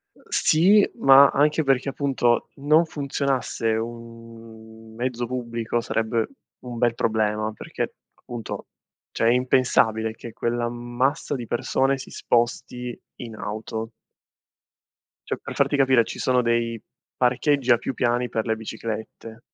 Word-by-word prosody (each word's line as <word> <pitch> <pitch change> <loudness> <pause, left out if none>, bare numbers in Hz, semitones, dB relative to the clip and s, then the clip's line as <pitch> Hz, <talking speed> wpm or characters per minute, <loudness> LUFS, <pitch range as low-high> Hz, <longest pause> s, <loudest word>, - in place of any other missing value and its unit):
Ehm, - - -22
sì, 195 +6 +4
ma 135 +1 +8
anche 150 +3 +2
perché, 135 -1 +1
appunto, 135 -4 +1
non 155 +4 +3
funzionasse 140 -6 -2
un 115 -1 -9
mezzo 120 0 -2
pubblico 120 -1 -3
sarebbe 115 0 -1 0.3
un 120 -1 -8
bel 120 0 +2
problema 110 -1 0
perché, - - -5 0.2
appunto, 120 -2 -7 0.4
cioè - - -1
è - - +6
impensabile 125 -3 +2
che 115 +1 -10
quell'ammasso 120 +4 -1
di 120 -3 -6
persone 135 +4 +1
si 130 - -9
sposti 120 +1 -1 0.2
in 115 -2 -8
auto. 110 +2 -5 1.4
Cioè, - - -2
per - - -7
farti 145 - +2
capire, 130 -3 +4
ci - - -8
sono 125 -1 +2
dei 115 -1 0 0.3
parcheggi 130 +1 +2
a 120 - +6
più 130 - -4
piani 120 0 0
per 110 0 -2
le 110 - 0
biciclette. 110 0 -7
120 Hz, 130 wpm, -24 LUFS, 115-130 Hz, 1.4 s, ma